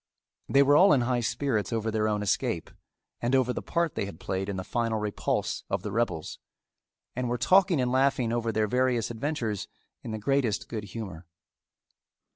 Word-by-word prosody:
They 140 0 +6
were 145 +1 +5
all 180 +1 +7
in 135 - +3
high 120 0 +1
spirits 115 -1 -1
over 115 -1 -1
their 110 0 +1
own 105 -1 0
escape 100 - -1 0.5
and 120 +3 +1
over 125 -1 +2
the - - -4
part 170 -3 -1
they - - -2
had 90 -4 -9
played 95 +1 -3
in 100 - -3
the 95 - -3
final 115 +1 -1
repulse 105 -1 -2
of - - -1
the 105 - -4
rebels, 110 -8 -2 0.8
and 125 0 -2
were 120 - 0
talking 185 - +4
and 125 -1 +1
laughing 130 -3 +2
over 115 -1 0
their 110 0 +1
various 125 -1 +1
adventures 115 -4 -3 0.3
in - - -7
the 110 - -3
greatest 115 -1 0
good 110 -2 -5
humor. 95 -5 -7
115 Hz, 185 wpm, -28 LUFS, 105-130 Hz, 0.8 s, all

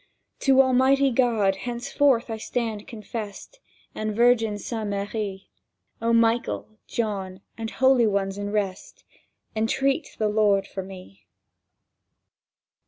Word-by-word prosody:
To 270 -1 +5
Almighty 265 +1 +3
God 225 -6 +2
henceforth 245 +2 +1
I 220 - -3
stand 220 -2 -3
confessed, 220 - -7 0.3
And 215 -1 -3
Virgin 230 -2 +3
Saint 220 0 -4
Marie; 200 -1 -4 0.5
O 230 0 +1
Michael, 230 -1 +1
John, 195 -4 -3
and 225 -1 -5
Holy 260 -2 +4
Ones 200 -1 -1
in 205 0 -3
rest, 200 -3 -3 0.5
Entreat 270 +7 0
the 215 - +1
Lord 210 -2 +2
for 195 - -6
me! 185 - -12
220 Hz, 110 wpm, -25 LUFS, 200-240 Hz, 0.5 s, To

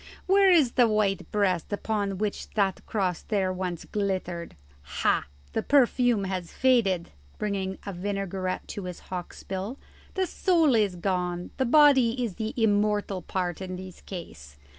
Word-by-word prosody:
Where 390 +1 +5
is 310 -9 +5
the 245 -2 +4
white 210 -3 0
breast 195 -5 +1
upon 205 -2 -1
which 210 +1 -3
that 195 -3 +1
cross 185 -5 -1
there 195 -4 0
once 180 -2 -4
glittered? 185 - -3 0.3
Ha! 70 -2 0 0.3
the - - 0
perfume 245 -5 +3
has 185 -3 -3
faded," 220 -9 +2 0.3
bringing 195 -2 -2
a 200 - -4
vinaigrette 190 0 -3
to 200 - -5
his 180 -1 -6
hawk's 180 -1 -6
bill; 195 +7 -4 0.4
"the 380 -1 +1
soul 335 -6 +2
is 210 -5 +2
gone; 180 -1 -2
the 265 - +1
body 260 -3 +5
is 205 -6 -6
the 220 0 -3
immortal 205 -3 +1
part 180 -1 -3
in 185 -1 -4
this 185 0 -9
case. 80 - -9
195 Hz, 150 wpm, -27 LUFS, 185-225 Hz, 0.4 s, Where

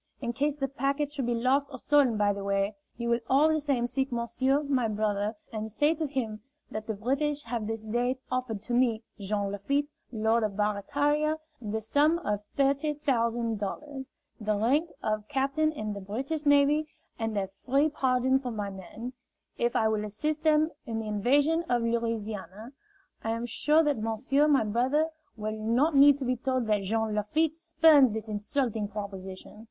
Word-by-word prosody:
In 240 -3 -3
case 285 +3 0
the 275 -2 -2
packet 275 +2 -1
should 270 -5 -2
be 240 - +1
lost 260 +4 +2
or 260 - -6
stolen 270 -4 +3
by 205 -1 +3
the 200 0 -6
way, 200 +1 0 0.2
you 235 0 -3
will 235 0 +2
all 285 +4 +5
the 315 0 +2
same 275 -5 0
seek 265 +2 -1
monsieur, 260 +4 +1
my 265 -5 +1
brother, 210 0 -1 0.2
and 215 0 -4
say 295 +8 +2
to 315 -1 -2
him 230 -6 -3 0.3
that 215 0 -5
the 220 - -2
British 280 +7 -1
have 230 -2 -3
this 225 0 -4
day 240 +4 0
offered 250 -5 -2
to 240 - -4
me, 240 -2 +2 0.2
Jean 200 0 -2
Lafitte, 280 +9 -1 0.2
Lord 220 0 +2
of 210 -2 -2
Barataria, 285 +9 +1 0.2
the 220 0 -3
sum 290 +9 +3
of 210 0 -1
thirty 280 +2 +1
thousand 235 -5 0
dollars, 265 +7 -5 0.3
the 215 -1 0
rank 270 +11 +2
of 215 -1 -1
captain 280 +3 +1
in 215 -8 -4
the 200 - -6
British 270 +10 -3
navy, 285 +2 +4 0.3
and 225 -2 -2
a 195 -1 -1
free 275 +4 +3
pardon 260 -2 +2
for 260 -2 -5
my 205 -3 -4
men, 195 +6 -8 0.5
if 240 0 +1
I 220 - +3
will 215 -1 0
assist 300 +9 -2
them 310 0 +3 0.2
in 225 -1 -3
their 220 -1 -3
invasion 285 +10 +2
of 240 -1 +2
Louisiana. 225 -2 -3 0.5
I 225 - -2
am 230 +1 -3
sure 300 +7 +3
that 290 -5 +1
monsieur, 225 +7 +1
my 280 -5 +4
brother, 255 +9 +1 0.3
will 215 0 -4
not 260 +8 +2
need 280 0 +7
to 275 - -4
be 250 0 0
told 255 0 -1
that 210 -2 +1
Jean 220 +2 -1
Lafitte 290 +10 +1
spurns 315 -6 +5
this 220 0 -5
insulting 215 +1 -1
proposition. 195 -1 -7
240 Hz, 180 wpm, -28 LUFS, 215-285 Hz, 0.5 s, need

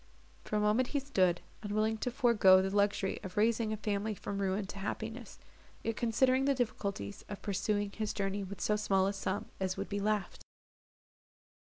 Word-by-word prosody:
For - - -3
a - - +3
moment 210 +4 +3
he 285 - 0
stood, 185 -11 +2 0.2
unwilling 215 +1 0
to 250 - -1
forego 230 -7 +5
the 190 +1 -1
luxury 200 -1 +1
of 185 0 -8
raising 220 +1 +2
a 215 - -2
family 210 0 -1
from 200 +1 -5
ruin 195 +1 0
to 195 +1 -8
happiness, 220 +3 -5 0.5
yet 225 - -1
considering 255 +4 +2
the 280 0 +3
difficulties 200 - -3
of 205 - -7
pursuing 205 0 0
his 215 0 -2
journey 200 0 -2
with 195 -1 -7
so 210 - +2
small 195 -2 +2
a 195 - 0
sum 195 0 -3
as 190 -1 -1
would - - -4
be 205 - -2
left. 210 0 -1
205 Hz, 180 wpm, -33 LUFS, 195-220 Hz, 0.5 s, forego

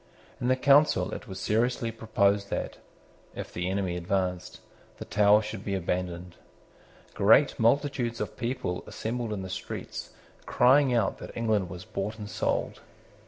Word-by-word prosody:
In 120 - -2
the 130 - +4
Council 140 +3 +4
it - - -7
was 95 -2 -7
seriously 115 +3 0
proposed 100 -3 +1
that, - - -3 0.6
if - - -7
the 90 +1 -2
enemy 95 -2 -1
advanced, 90 0 -2 0.4
the - - -7
Tower 105 +1 +4
should 105 -1 -6
be 100 -2 -2
abandoned. 90 -1 -3 0.8
Great 110 +8 +4
multitudes 120 0 +1
of - - -4
people 120 -7 -3
assembled 115 0 -4
in 100 -3 -3
the - - -5
streets 95 - -6 0.4
crying 130 +2 +4
out 115 -5 +1
that - - -9
England 110 -5 +1
was 90 0 -8
bought 105 +4 -4
and 105 -2 -7
sold. - - -1
105 Hz, 150 wpm, -28 LUFS, 95-120 Hz, 0.8 s, the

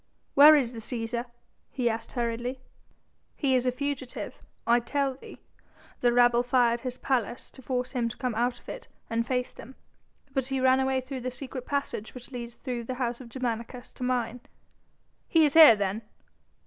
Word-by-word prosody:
"Where 295 +2 +9
is 255 -5 +1
the 230 - -7
Cæsar?" 235 +1 -3 0.4
he 250 -3 -1
asked 230 0 -3
hurriedly. 240 +1 -2 0.8
"He 275 -3 +1
is 255 0 +2
a - - +3
fugitive, 270 -1 -5 0.2
I 235 +1 +4
tell 275 +3 -1
thee. 260 - -12 0.6
The 245 - +3
rabble 240 0 +5
fired 245 -1 +2
his 250 0 -5
palace 245 -3 -2
to 265 - -14
force 250 0 -2
him 240 -3 -1
to - - -9
come 250 -3 -2
out 240 +2 0
of - - -27
it - - -8 0.2
and 230 +1 0
face 250 -1 -1
them. 260 +3 -12 0.6
But 265 -2 0
he 270 -1 -1
ran 260 0 +4
away 265 0 +1
through 260 0 -6
the 255 - -2
secret 255 0 -7
passage 280 -6 -3
which 250 +1 -10
leads 240 -2 -7
through 245 -3 -5
the 255 - -4
house 245 -1 -2
of 240 - -11
Germanicus 245 0 -4
to - - -7
mine." 250 -1 -1 0.9
"He 325 -2 +5
is 290 - +1
here 315 -8 +10
then?" 200 +1 -2
250 Hz, 185 wpm, -28 LUFS, 235-265 Hz, 0.9 s, here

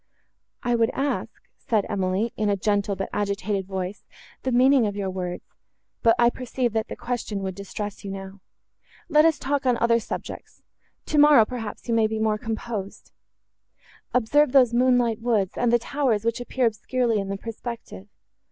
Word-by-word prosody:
"I 245 - +1
would 230 -1 +3
ask," 280 +1 -1 0.3
said 215 -4 0
Emily, 195 +3 -1
in 215 -1 0
a 200 - +1
gentle, 205 0 0
but 195 0 -3
agitated 200 -1 -1
voice, 190 0 -4 0.4
"the 260 - -2
meaning 255 -1 +5
of 205 - -4
your 195 -2 -2
words; 180 -1 -4 0.6
but 230 -2 +5
I 240 0 +4
perceive, 250 -2 -2
that 220 -1 -1
the - - -6
question 225 -5 -4
would 190 -1 -3
distress 200 +2 -6
you 200 - -6
now. 195 0 -8 0.7
Let 305 -1 +5
us 325 -3 +4
talk 275 0 -1
on 245 -2 +3
other 235 0 +3
subjects. - - -7 0.4
Tomorrow, 295 -6 +6
perhaps, 225 -1 -7
you 235 - 0
may 225 -1 +3
be 220 0 -3
more 215 -1 +1
composed. 220 -3 -5 1.0
Observe 255 +4 +3
those 250 -4 +5
moonlight 245 -2 +3
woods, 220 -6 +1
and 240 -1 +1
the 240 - +5
towers, 235 -3 -1
which 230 +1 0
appear 250 +1 -1
obscurely 230 +1 0
in 195 -1 -4
the 195 - -2
perspective. 225 - -7
225 Hz, 170 wpm, -24 LUFS, 200-245 Hz, 1.0 s, Tomorrow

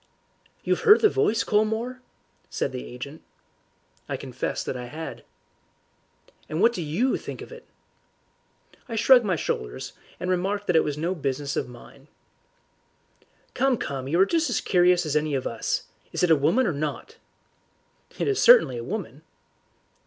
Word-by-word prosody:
"You've - - +1
heard 435 -1 +6
the 430 - +6
voice, 230 - +1
Colmore?" 220 +4 0 0.5
said - - -2
the 60 - -6
agent. - - -9 0.9
I - - -2
confessed - - -4
that - - -3
I 125 -1 -5
had. 135 -2 -7 1.3
"And 155 +2 -3
what 230 +4 +4
do 180 - -4
YOU 175 - 0
think - - -8
of - - -13
it?" 480 -1 -12 1.2
I 230 - -4
shrugged 245 +2 +6
my 185 -4 +1
shoulders, 60 - -4 0.3
and 180 0 -2
remarked 195 +3 -1
that 180 - +1
it 160 - +5
was 150 -1 -3
no 170 +4 -1
business 140 -3 -3
of - - -2
mine. 125 +3 -15 1.5
"Come, 265 -1 +2
come, 135 -7 -4
you 165 +5 +1
are 190 - +7
just 325 +4 0
as 245 - 0
curious 180 -1 +3
as 150 -1 -2
any 150 -1 +1
of 130 - -2
us. 115 -1 -2 0.3
Is - - -2
it 175 - +4
a - - +8
woman 210 - +2
or 180 - 0
not?" 155 - -5 1.0
"It - - -1
is 410 -1 +1
certainly 475 - +6
a - - -6
woman." 175 - -5
180 Hz, 165 wpm, -25 LUFS, 145-235 Hz, 1.5 s, a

